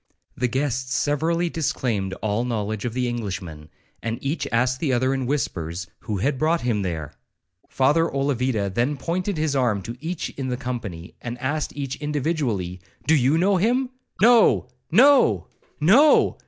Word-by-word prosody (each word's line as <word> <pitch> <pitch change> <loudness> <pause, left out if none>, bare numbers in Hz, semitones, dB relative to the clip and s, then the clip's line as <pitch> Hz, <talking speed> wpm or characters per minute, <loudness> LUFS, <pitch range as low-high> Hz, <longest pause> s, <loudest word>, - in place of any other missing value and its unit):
The 125 - 0
guests 130 0 -1
severally 165 +4 +1
disclaimed 120 - -1
all 110 +2 0
knowledge 110 -3 -2
of 120 -1 -3
the 125 -1 0
Englishman, 95 -10 -5 0.3
and 115 0 -3
each 140 +1 -2
asked 125 +2 +1
the 150 -5 0
other 130 +2 +2
in 135 -2 -2
whispers, 85 - -2
'who 105 - -4
had 130 +7 0
brought 165 +2 +2
him 115 -4 0
there?' 80 -6 -4 0.6
Father 150 +5 +3
Olavida 130 -7 0
then 125 +6 0
pointed 180 +5 -2
his 155 -2 0
arm 115 -7 +1
to 115 +4 -6
each 165 +2 -3
of 135 - -2
the 125 -1 -2
company, 115 -10 -6
and 120 0 -5
asked 145 +5 -2
each 135 -2 -3
individually, 135 - -2 0.2
'Do 160 - +4
you 140 +2 +3
know 190 +3 +3
him?' 245 +7 +1 0.3
'No! 230 - +5 0.2
no! 235 - +5 0.3
no!' 240 - +5
130 Hz, 155 wpm, -23 LUFS, 110-155 Hz, 0.6 s, No